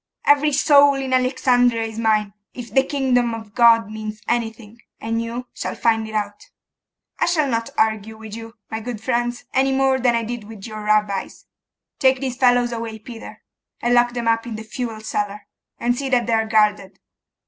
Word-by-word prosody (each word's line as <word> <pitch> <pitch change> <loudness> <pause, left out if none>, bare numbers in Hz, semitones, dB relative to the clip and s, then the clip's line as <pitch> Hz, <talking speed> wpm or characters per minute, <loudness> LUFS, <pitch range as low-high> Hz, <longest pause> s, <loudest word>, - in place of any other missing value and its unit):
Every 290 +1 +4
soul 285 0 +5
in 265 -1 -3
Alexandria 250 -2 +2
is 225 0 -5
mine, 215 -3 +1 0.2
if 235 -4 -8
the 265 - +5
kingdom 255 -4 0
of 220 -2 -10
God 230 -3 +5
means 215 0 -6
anything; 230 -1 -3 0.2
and 225 +1 -2
you 235 +2 -5
shall - - -4
find 225 -1 +1
it 220 - -8
out. 205 -1 -3 0.7
I - - +2
shall 310 -4 +2
not 230 -3 -1
argue 220 0 0
with 220 -1 -9
you, 225 0 -9 0.2
my 220 - -3
good 230 0 -6
friends, 240 +1 -1
anymore 265 0 +2
than 245 -2 +2
I 230 - 0
did 235 -1 -5
with 215 -2 -10
your 215 -1 -7
Rabbis. 210 -2 0 0.5
Take 260 -1 +4
these 255 -2 -4
fellows 245 -2 +3
away, 230 -1 -5
Peter, 225 +1 -11 0.4
and 240 +1 +1
lock 240 0 +4
them 240 -1 -3
up 230 +1 +1
in 230 - -5
the 220 - -7
fuel 225 0 -5
cellar, 205 -1 -3 0.3
and 245 +1 +1
see 270 +1 -3
that 245 -3 +2
they 230 - -1
are 220 0 +1
guarded. 210 -3 +1
230 Hz, 185 wpm, -21 LUFS, 220-245 Hz, 0.7 s, soul